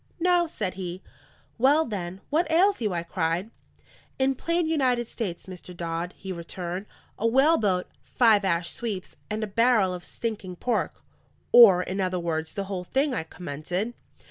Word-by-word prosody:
"No," 350 0 +3
said 205 -11 -3
he. 185 0 -6 0.6
"Well, 290 +6 +5
then, 190 -3 -5
what 320 +2 +2
ails 365 +1 +3
you?" 215 -3 0
I 170 -1 -2
cried. 170 +4 -2 0.7
"In 265 0 +2
plain 335 +5 0
United 255 -7 +1
States, 195 -9 -5
Mr. 180 -1 -10
Dodd," 170 +1 -3
he 190 - -7
returned, 180 +2 -5 0.3
"a 230 - +2
whaleboat, 230 - +3 0.2
five 220 -4 +4
ash 170 -2 0
sweeps, 210 -6 -4
and 215 +1 -2
a - - +1
barrel 215 -2 +3
of 180 -1 -7
stinking 200 -4 -4
pork." 245 +7 -2 0.5
"Or, 195 -7 +8
in 195 +2 -3
other 185 -1 0
words, 160 -2 -3
the 200 - -2
whole 190 -2 -4
thing?" 270 +7 +1
I 235 - -1
commented. 175 +7 -4
200 Hz, 160 wpm, -26 LUFS, 180-245 Hz, 0.7 s, Or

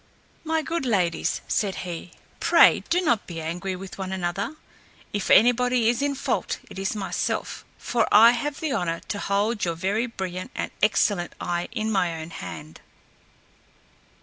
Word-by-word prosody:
"My 320 0 0
good 330 0 -2
ladies," 190 -9 0
said 200 -3 0
he, 175 0 -6 0.3
"pray - - +6
do 355 +1 +3
not 235 - +1
be 170 -2 -6
angry 175 +4 -3
with 190 +1 -9
one 190 -1 -4
another. 190 - -2 0.6
If 205 -1 -2
anybody 245 0 +5
is 240 +2 0
in 285 0 0
fault, - - -1
it - - -7
is 195 +2 -1
myself; 200 -2 -2
for 235 -2 0
I 225 +3 +9
have 280 +4 -3
the 315 -3 -1
honor 170 -7 -1
to 205 - -2
hold 205 +3 0
your 170 -2 0
very 200 +8 0
brilliant 185 -5 -5
and - - -3
excellent 205 -4 +2
eye 175 0 -2
in 220 -2 -2
my 175 -5 0
own 160 +1 -8
hand!" 80 - -8
200 Hz, 160 wpm, -25 LUFS, 175-240 Hz, 0.6 s, I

